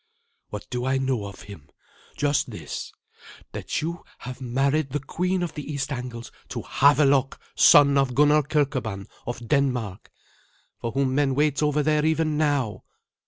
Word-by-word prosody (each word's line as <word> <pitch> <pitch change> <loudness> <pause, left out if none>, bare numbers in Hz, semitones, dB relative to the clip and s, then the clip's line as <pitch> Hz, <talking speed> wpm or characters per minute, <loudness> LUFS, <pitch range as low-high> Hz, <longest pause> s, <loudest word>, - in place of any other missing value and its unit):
"What 105 -1 -7
do 125 -1 -2
I 130 +1 +1
know 130 -5 -1
of 100 - -11
him? 100 -8 -12 0.5
Just 145 -1 +1
this 85 -10 -6 0.6
that - - -3
you 170 +2 -4
have 125 +1 -8
married 135 +4 0
the 145 - 0
queen 180 +5 -1
of 175 - -4
the 150 0 -6
East 140 0 -3
Angles 125 -3 -6 0.2
to - - -5
Havelok, 140 -1 +3
son 140 -1 +6
of 130 -3 0
Gunnar 150 +2 +5
Kirkeban 130 -9 -1 0.2
of 120 -1 -5
Denmark, 125 -9 -1 0.7
for 115 - -4
whom 135 -1 +1
men 135 -1 +2
wait 145 0 +1
over 150 0 +2
there 150 0 +2
even 160 0 +1
now. 145 -7 0
140 Hz, 155 wpm, -25 LUFS, 125-150 Hz, 0.7 s, son